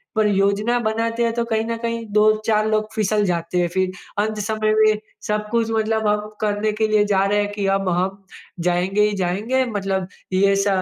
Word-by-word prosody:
पर 215 Hz, -1 st, +3 dB
योजना 200 Hz, +4 st, +1 dB
बनाते 230 Hz, +2 st, 0 dB
हैं, 230 Hz, -, +1 dB
तो 235 Hz, 0 st, 0 dB
कहीं 220 Hz, -1 st, -1 dB
ना 230 Hz, 0 st, -2 dB
कहीं 230 Hz, -1 st, -3 dB
2-4 215 Hz, 0 st, +3 dB
लोग 215 Hz, 0 st, +1 dB
फिसल 210 Hz, -1 st, +1 dB
जाते 170 Hz, -1 st, -2 dB
हैं, 175 Hz, -, +1 dB
फिर 185 Hz, -1 st, +1 dB, 0.3 s
अंत 215 Hz, +1 st, -1 dB
समय 215 Hz, +1 st, 0 dB
में 215 Hz, -1 st, +4 dB, 0.3 s
सब 210 Hz, 0 st, -1 dB
कुछ 230 Hz, -1 st, +1 dB
मतलब 220 Hz, 0 st, 0 dB
हम 210 Hz, 0 st, 0 dB
करने 210 Hz, 0 st, 0 dB
के 215 Hz, +1 st, 0 dB
लिए 215 Hz, -1 st, +3 dB
जा 195 Hz, -2 st, +2 dB
रहे 205 Hz, +1 st, +1 dB
हैं 205 Hz, -, -2 dB
कि 205 Hz, -1 st, -2 dB
अब 195 Hz, -1 st, -2 dB
हम 190 Hz, +3 st, -1 dB, 0.4 s
जाएँगे 180 Hz, +4 st, +1 dB
ही 210 Hz, -, -2 dB
जाएँगे 205 Hz, +9 st, 0 dB
मतलब 195 Hz, -5 st, -2 dB, 0.3 s
ये 195 Hz, +1 st, +3 dB
श 195 Hz, +1 st, +1 dB
210 Hz, 200 wpm, -21 LUFS, 195-220 Hz, 0.4 s, में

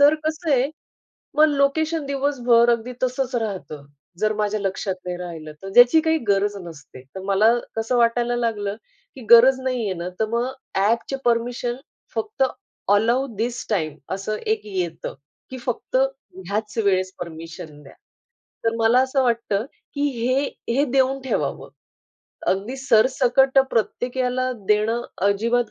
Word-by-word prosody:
तर 290 Hz, +2 st, +7 dB
कसं 315 Hz, +1 st, -2 dB
आहे? 270 Hz, +1 st, +3 dB, 0.6 s
मग 305 Hz, +1 st, +6 dB
लोकेशन 295 Hz, +2 st, +1 dB
दिवसभर 250 Hz, -4 st, +3 dB
अगदी 235 Hz, +2 st, -1 dB
तसंच 255 Hz, 0 st, -1 dB
राहतं, 190 Hz, -10 st, -4 dB, 0.3 s
जर 215 Hz, 0 st, +1 dB
माझ्या 210 Hz, 0 st, -1 dB
लक्षात 195 Hz, 0 st, -2 dB
नाही 180 Hz, -1 st, -3 dB
राहिलं 165 Hz, -4 st, -7 dB
तर, 195 Hz, -, -6 dB
ज्याची 245 Hz, +7 st, +7 dB
काही 320 Hz, 0 st, +1 dB
गरज 200 Hz, +1 st, +2 dB
नसते. 145 Hz, -5 st, -12 dB
तर 190 Hz, -, -6 dB
मला 200 Hz, +4 st, +4 dB, 0.2 s
कसं 225 Hz, +3 st, 0 dB
वाटायला 240 Hz, +1 st, +2 dB
लागलं? 210 Hz, -4 st, -1 dB, 0.4 s
की 265 Hz, -, -10 dB
गरज 255 Hz, +3 st, +8 dB
नाही 255 Hz, -3 st, -1 dB
आहे 190 Hz, -2 st, -1 dB
ना, 175 Hz, +1 st, -4 dB
तर 220 Hz, -, +2 dB
मग 235 Hz, +2 st, 0 dB, 0.3 s
ॲपचे 230 Hz, +6 st, +1 dB
परमिशन 240 Hz, +1 st, 0 dB, 0.4 s
फक्त 425 Hz, -9 st, -2 dB, 0.5 s
अलाउ 235 Hz, +6 st, +2 dB
दिस 240 Hz, +3 st, -3 dB
टाईम 155 Hz, -7 st, -1 dB, 0.2 s
असं 205 Hz, +2 st, -3 dB
एक 440 Hz, -, 0 dB
येतं, 180 Hz, -5 st, -4 dB, 0.4 s
की 260 Hz, -, -6 dB
फक्त 245 Hz, +1 st, -2 dB
ह्याच 215 Hz, -6 st, -2 dB
वेळेस 185 Hz, -1 st, +1 dB
परमिशन 160 Hz, -3 st, -8 dB
द्या. 135 Hz, -, -15 dB, 0.7 s
तर 225 Hz, 0 st, +1 dB
मला 230 Hz, +2 st, +4 dB
असं 265 Hz, +1 st, +1 dB
वाटतं, 230 Hz, -2 st, 0 dB, 0.3 s
की 285 Hz, -, -2 dB
हे, 255 Hz, +2 st, 0 dB, 0.3 s
हे 280 Hz, +2 st, +3 dB
देऊन 270 Hz, 0 st, +2 dB
ठेवावं. 265 Hz, -, -2 dB, 0.8 s
अगदी 205 Hz, +8 st, -1 dB
सरसकट 265 Hz, +2 st, +3 dB
प्रत्येक 245 Hz, +3 st, -1 dB
ह्याला 255 Hz, 0 st, 0 dB, 0.2 s
देणं 220 Hz, +3 st, +2 dB, 0.3 s
अजिबात 230 Hz, +3 st, +1 dB
235 Hz, 140 wpm, -22 LUFS, 200-260 Hz, 0.8 s, गरज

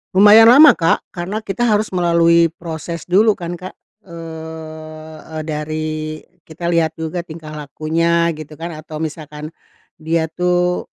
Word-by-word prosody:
Lumayan 210 Hz, +4 st, +8 dB
lama, 290 Hz, +4 st, +8 dB
Kak, 165 Hz, -1 st, 0 dB
karena 185 Hz, +5 st, -3 dB
kita 215 Hz, +2 st, -3 dB
harus 215 Hz, -2 st, +2 dB
melalui 170 Hz, -1 st, +3 dB
proses 165 Hz, 0 st, -6 dB
dulu 210 Hz, +5 st, +4 dB
kan 175 Hz, -3 st, -5 dB
Kak, 185 Hz, +2 st, -8 dB, 0.3 s
eee 160 Hz, -2 st, -9 dB
eee, 160 Hz, -1 st, -7 dB
dari 155 Hz, 0 st, -3 dB, 0.5 s
kita 170 Hz, +2 st, -7 dB
lihat 165 Hz, -2 st, 0 dB
juga 160 Hz, +2 st, -4 dB
tingkah 155 Hz, -2 st, -10 dB
lakunya 165 Hz, +3 st, 0 dB
gitu 155 Hz, 0 st, -11 dB
kan, 170 Hz, 0 st, -6 dB
atau 155 Hz, 0 st, -8 dB
misalkan 150 Hz, -1 st, -6 dB, 0.5 s
dia 160 Hz, +1 st, -1 dB
tuh 180 Hz, +1 st, 0 dB
165 Hz, 135 wpm, -18 LUFS, 155-175 Hz, 0.5 s, Lumayan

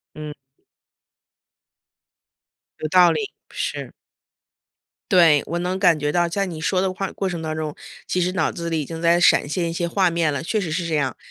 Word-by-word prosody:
嗯。 150 Hz, -1 st, -7 dB, 2.5 s
有 155 Hz, -, -2 dB
道 180 Hz, 0 st, +6 dB
理， 435 Hz, -1 st, -2 dB, 0.2 s
是。 -, -, -4 dB, 1.2 s
对， 165 Hz, -6 st, +6 dB
我 170 Hz, +2 st, -3 dB
能 180 Hz, +2 st, -2 dB
感 175 Hz, -5 st, +4 dB
觉 145 Hz, 0 st, -1 dB
到 175 Hz, +2 st, +1 dB
在 195 Hz, +3 st, -1 dB
你 165 Hz, -4 st, -6 dB
说 185 Hz, +2 st, +1 dB
的 190 Hz, 0 st, 0 dB
话 195 Hz, 0 st, -4 dB
过 195 Hz, -, -3 dB
程 175 Hz, -3 st, -4 dB
当 155 Hz, -1 st, -3 dB
中， 155 Hz, -1 st, -4 dB, 0.3 s
其 180 Hz, -, 0 dB
实 180 Hz, +1 st, +1 dB
脑 185 Hz, -, 0 dB
子 170 Hz, 0 st, -5 dB
里 160 Hz, -1 st, 0 dB
已 145 Hz, -, -3 dB
经 165 Hz, +2 st, -7 dB
在 170 Hz, 0 st, +4 dB
闪 170 Hz, -4 st, +4 dB
现 170 Hz, +1 st, -1 dB
一 165 Hz, -, -4 dB
些 170 Hz, 0 st, -1 dB
画 185 Hz, +1 st, +2 dB
面 165 Hz, -2 st, +1 dB
了， 140 Hz, -, -3 dB
确 210 Hz, +6 st, -1 dB
实 165 Hz, -4 st, -4 dB
是 170 Hz, +1 st, -2 dB
这 160 Hz, -, -1 dB
样， 140 Hz, -3 st, -1 dB
170 Hz, 210 characters per minute, -22 LUFS, 155-180 Hz, 2.5 s, 道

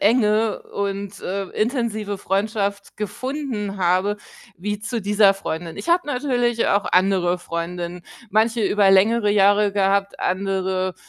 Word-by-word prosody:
enge 215 Hz, 0 st, +2 dB
und, 200 Hz, 0 st, -3 dB
äh, 195 Hz, +2 st, -3 dB
intensive 220 Hz, -3 st, -2 dB
Freundschaft 200 Hz, +1 st, -2 dB
gefunden 220 Hz, -1 st, -4 dB
habe 185 Hz, +3 st, +1 dB, 0.4 s
wie 205 Hz, +3 st, -3 dB
zu 230 Hz, +2 st, -4 dB
dieser 205 Hz, 0 st, +4 dB
Freundin. 165 Hz, -3 st, -5 dB
Ich -, -, -7 dB
habe 345 Hz, -1 st, +3 dB
natürlich 245 Hz, -4 st, 0 dB
auch 200 Hz, 0 st, +2 dB
andere 180 Hz, -1 st, +2 dB
Freundinnen, 175 Hz, +1 st, -5 dB, 0.3 s
manche 220 Hz, +2 st, +2 dB
über 200 Hz, 0 st, +3 dB
längere 210 Hz, +3 st, +4 dB
Jahre 205 Hz, 0 st, +4 dB
gehabt, 200 Hz, 0 st, +1 dB
andere, 185 Hz, -1 st, -1 dB
200 Hz, 125 wpm, -22 LUFS, 190-220 Hz, 0.4 s, dieser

